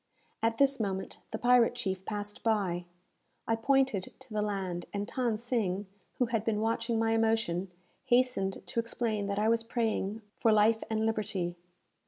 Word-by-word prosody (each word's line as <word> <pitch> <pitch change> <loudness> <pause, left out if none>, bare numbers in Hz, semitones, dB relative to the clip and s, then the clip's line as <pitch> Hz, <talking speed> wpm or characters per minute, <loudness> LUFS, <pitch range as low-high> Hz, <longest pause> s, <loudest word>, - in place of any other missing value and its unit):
At 225 0 +1
this 275 -1 +3
moment 190 -3 -3
the - - -3
pirate 245 -1 +4
chief 190 -6 -3
passed 205 -1 -5
by. 195 -6 +1 0.6
I 225 - +3
pointed 260 -4 +2
to - - -12
the 210 - +1
land, 190 -4 -2
and 205 0 -2
Than 240 -2 -1
Sing, 215 -5 -1 0.3
who 250 - +3
had 230 -2 -1
been 220 -2 0
watching 230 +1 0
my 225 0 +2
emotion, 225 -5 +1 0.4
hastened 245 -6 +2
to - - -2
explain 225 -3 -1
that 200 0 -2
I 210 +1 +2
was 230 0 +3
praying 225 -2 -1 0.2
for 225 - +4
life 215 +1 +4
and 220 0 +1
liberty. 200 -5 -1
220 Hz, 165 wpm, -31 LUFS, 200-230 Hz, 0.6 s, pirate